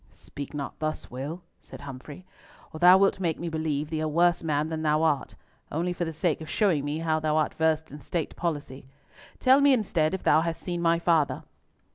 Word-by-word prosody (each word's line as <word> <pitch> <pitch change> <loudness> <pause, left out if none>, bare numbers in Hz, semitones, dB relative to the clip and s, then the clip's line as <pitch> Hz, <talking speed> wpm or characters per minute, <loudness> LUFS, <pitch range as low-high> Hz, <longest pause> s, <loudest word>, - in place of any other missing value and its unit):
"Speak 140 +1 -9
not 140 -2 -5
thus, 155 0 -4
Will," 145 +8 -6 0.2
said - - -12
Humfrey, 145 +5 -10 0.5
"or 155 - -7
thou 180 +2 +8
wilt 195 0 +2
make 170 -4 -1
me 170 - -3
believe 155 -2 -2
thee 160 - -1
a 155 - -1
worse 170 +3 +2
man 150 -1 0
than 160 -1 -3
thou 155 0 +2
art, 150 -4 0 0.4
only 175 +4 -1
for 175 0 -3
the 165 - -4
sake 160 0 -1
of 160 - -8
showing 180 -10 +1
me 145 +2 -2
how 160 -1 0
thou 155 0 0
art 155 - +1
versed 160 -1 0
in 145 +1 -10
state 165 0 -3
policy. 145 -6 -4 0.5
Tell 265 +2 +5
me, 280 -1 +6
instead, 190 -8 +1
if 190 - -7
thou 155 +2 +4
hast 165 0 -3
seen 175 -1 -3
my 170 0 +3
father." 160 -6 +1
160 Hz, 210 wpm, -27 LUFS, 150-170 Hz, 0.5 s, thou